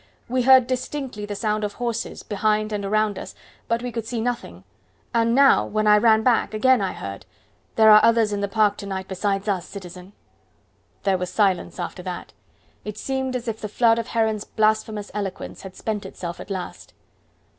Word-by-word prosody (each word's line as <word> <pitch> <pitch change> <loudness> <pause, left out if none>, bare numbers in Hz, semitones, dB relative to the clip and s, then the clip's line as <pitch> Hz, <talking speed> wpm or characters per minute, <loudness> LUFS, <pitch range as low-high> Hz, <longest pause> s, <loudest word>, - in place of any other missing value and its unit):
We 255 +1 0
heard 260 0 +7
distinctly 255 -3 -4
the 205 - -4
sound 215 0 -1
of 205 -1 -2
horses 235 -1 -4
behind 215 +1 0
and 205 -1 -2
around 210 0 0
us, - - -9 0.3
but 230 +1 0
we 245 - -3
could 230 -1 -5
see 235 -1 -3
nothing; 245 +1 -4 0.5
and 230 0 +2
now, 275 0 +6
when 215 0 -1
I 210 0 +6
ran 220 0 +4
back, 230 -3 +2
again 255 +2 +4
I 190 -2 -1
heard. 100 0 -8 0.5
There 220 -1 +7
are 215 0 +8
others 230 -2 +4
in 200 - -2
the 200 - 0
park 205 0 +2
to 200 - -7
night 190 -1 -4
besides 195 +1 -2
us, 190 -4 -1
citizen." 185 0 -10 0.9
There 195 -2 +2
was 180 0 -3
silence 190 -4 0
after 175 +1 -5
that. 180 -1 -7 0.5
It 210 -1 -6
seemed 265 +2 -2
as 245 -1 -4
if 220 -1 -4
the 210 - -4
flood 230 +1 +3
of 230 - -4
Heron's 220 -2 0
blasphemous 215 -1 0
eloquence 200 -2 -5
had 190 -1 -10
spent 215 -2 -3
itself 175 -2 -7
at - - -9
last. 185 -2 -6
215 Hz, 190 wpm, -23 LUFS, 200-230 Hz, 0.9 s, are